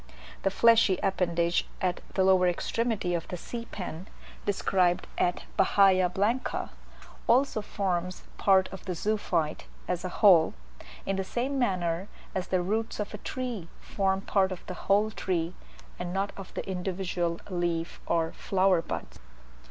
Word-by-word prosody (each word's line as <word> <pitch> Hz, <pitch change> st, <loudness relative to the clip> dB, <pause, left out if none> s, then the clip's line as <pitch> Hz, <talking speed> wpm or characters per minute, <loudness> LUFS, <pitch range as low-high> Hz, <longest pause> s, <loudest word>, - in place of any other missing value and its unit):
The 195 Hz, -, +2 dB
fleshy 225 Hz, -2 st, +5 dB
appendage 170 Hz, -3 st, +1 dB
at 180 Hz, -1 st, -1 dB
the 190 Hz, -, +3 dB
lower 185 Hz, -1 st, +5 dB
extremity 210 Hz, +1 st, 0 dB
of 170 Hz, -1 st, -2 dB
the 180 Hz, -, -5 dB
sea 230 Hz, +6 st, -6 dB
pen 180 Hz, -1 st, -6 dB, 0.4 s
(described 185 Hz, -3 st, +2 dB
at 175 Hz, -, +1 dB
Bahia 190 Hz, -2 st, +5 dB
Blanca) 210 Hz, +8 st, -1 dB, 0.6 s
also 250 Hz, -2 st, +3 dB
forms 185 Hz, -3 st, -2 dB, 0.2 s
part 190 Hz, -1 st, +5 dB
of 190 Hz, -, -9 dB
the 185 Hz, -2 st, -2 dB
zoophyte, 175 Hz, -5 st, -1 dB, 0.2 s
as 180 Hz, -1 st, -1 dB
a 185 Hz, -, -2 dB
whole, 180 Hz, -, +5 dB, 0.5 s
in 195 Hz, 0 st, -1 dB
the 195 Hz, -, 0 dB
same 260 Hz, +7 st, -2 dB
manner 185 Hz, -5 st, 0 dB, 0.3 s
as 185 Hz, -1 st, -2 dB
the 185 Hz, -1 st, +1 dB
roots 220 Hz, +5 st, -1 dB
of 210 Hz, 0 st, -3 dB
a 210 Hz, -, -6 dB
tree 245 Hz, -9 st, -4 dB
form 195 Hz, -1 st, 0 dB
part 195 Hz, -1 st, +2 dB
of 185 Hz, -, -7 dB
the 185 Hz, -, -5 dB, 0.2 s
whole 210 Hz, +2 st, +4 dB
tree, 175 Hz, -4 st, -1 dB, 0.5 s
and 180 Hz, 0 st, -3 dB
not 195 Hz, +2 st, -1 dB
of 195 Hz, -1 st, -9 dB
the -, -, -4 dB
individual 180 Hz, -2 st, -2 dB
leaf 170 Hz, -2 st, -2 dB
or 165 Hz, -1 st, +1 dB
flower 190 Hz, -2 st, +2 dB
buds. 65 Hz, -, -6 dB
190 Hz, 150 wpm, -28 LUFS, 175-205 Hz, 0.6 s, fleshy